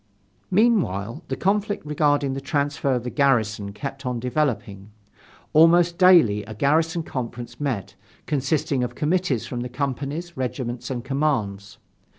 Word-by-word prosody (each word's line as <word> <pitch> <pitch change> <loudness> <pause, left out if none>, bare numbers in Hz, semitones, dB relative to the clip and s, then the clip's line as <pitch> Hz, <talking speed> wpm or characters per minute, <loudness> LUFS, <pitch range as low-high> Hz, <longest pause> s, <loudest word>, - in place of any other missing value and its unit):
Meanwhile 165 - +1
the - - -2
conflict 205 0 0
regarding 145 -2 +1
the 135 - -4
transfer 140 -1 0
of 120 - -2
the 125 - -4
garrison 110 -7 +1
kept 135 +5 -6
on 125 -2 -2
developing. 120 -7 -2 0.6
Almost 170 +2 +5
daily, 170 - +6
a 110 0 -8
garrison 160 +7 +1
conference 120 -4 -6
met, 115 -10 -3 0.3
consisting 140 -2 0
of 125 - -4
committees 155 -6 0
from 120 -2 -4
the 125 - -4
companies, 140 +6 -4
regiments 125 -2 -4
and 125 -3 -3
commands. 125 -9 -1
135 Hz, 135 wpm, -23 LUFS, 120-155 Hz, 0.6 s, daily